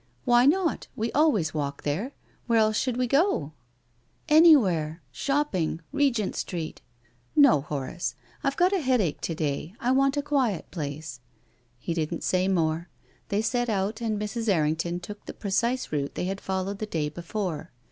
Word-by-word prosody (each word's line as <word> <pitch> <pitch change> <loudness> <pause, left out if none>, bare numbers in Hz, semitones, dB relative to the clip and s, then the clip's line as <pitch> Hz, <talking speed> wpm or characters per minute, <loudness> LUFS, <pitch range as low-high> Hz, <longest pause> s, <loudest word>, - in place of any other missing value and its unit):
" - - -38
Why 240 +1 +5
not? 345 +2 +1
We 225 +1 -2
always 245 - +2
walk 145 -2 -3
there. 190 - -2 0.3
Where 230 -1 +3
else 215 -1 +3
should 250 +2 0
we 250 - +2
go? 275 - +1 0.3
" 120 -1 -41
" 225 - -23
Anywhere 180 - +5
— - - -38
shopping 275 - 0
— - - -40
Regent 240 -8 +1
Street." 165 -3 -4 0.3
" 120 +1 -38
No, 280 - +6
Horace. 145 +4 -4 0.3
I've 275 0 0
got 365 +2 +4
a 390 - +2
headache 250 - +1
to 165 - -2
day. 155 +3 -3
I 250 -1 +1
want 275 +1 +3
a 290 - 0
quiet 265 - 0
place." 145 -4 -5 0.6
He 145 +7 -3
didn't 165 0 -2
say 185 0 +1
more. 165 -2 0 0.4
They 205 +1 0
set 245 +1 0
out, 210 +2 -1
and 220 -2 -1
Mrs. 220 +2 -2
Errington 165 0 +1
took 205 +3 -9
the - - -7
precise 235 +5 -1
route 140 -2 -2
they - - -2
had 195 +1 -3
followed 190 +1 -3
the 215 - -3
day 160 -6 -1
before. 170 0 -4
195 Hz, 180 wpm, -27 LUFS, 160-245 Hz, 0.6 s, No